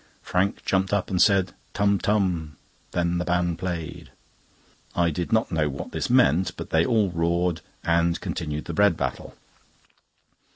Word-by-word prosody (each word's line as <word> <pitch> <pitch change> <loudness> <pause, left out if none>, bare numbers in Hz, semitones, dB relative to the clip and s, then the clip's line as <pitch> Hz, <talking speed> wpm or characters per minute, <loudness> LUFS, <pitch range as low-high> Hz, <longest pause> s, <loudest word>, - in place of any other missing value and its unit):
Frank 95 +2 -1
jumped 95 0 +1
up 100 -2 0
and 90 - +2
said: 95 -3 +4 0.2
"Tum, 100 -1 +2
tum; 90 -7 0 0.3
then 85 0 0
the - - 0
band 90 -1 0
played." 85 -4 -5 0.9
I 85 -1 +2
did 85 +3 -4
not 110 -3 +2
know 80 -3 +1
what 70 - -6
this - - -3
meant, 85 +7 +3
but - - -7
they 80 0 +4
all 105 -2 +2
roared, 85 0 0 0.2
and 85 0 +2
continued 75 -1 -4
the 85 - -5
bread 100 0 +3
battle. - - -4
90 Hz, 155 wpm, -25 LUFS, 85-95 Hz, 0.9 s, said